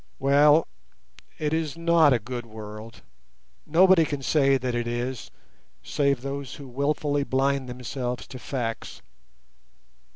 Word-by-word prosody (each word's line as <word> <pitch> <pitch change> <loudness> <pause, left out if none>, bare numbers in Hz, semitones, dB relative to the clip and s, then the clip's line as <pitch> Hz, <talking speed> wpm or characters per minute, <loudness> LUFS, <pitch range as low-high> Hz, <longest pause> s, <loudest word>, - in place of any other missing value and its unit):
Well, 145 +3 +4 0.7
it 150 0 -1
is 160 -1 -2
not 165 -3 +4
a 125 - +4
good 120 +1 -6
world—nobody 110 - -1
can 145 -3 -4
say 135 -1 +3
that 125 -1 -3
it 120 0 -2
is, 120 +1 -4 0.5
save 140 - 0
those 140 -2 -5
who 140 - -10
wilfully 145 +2 -1
blind 135 -1 0
themselves 125 0 -4
to 130 - -10
facts. 120 -3 -5
135 Hz, 120 wpm, -25 LUFS, 120-145 Hz, 0.7 s, Well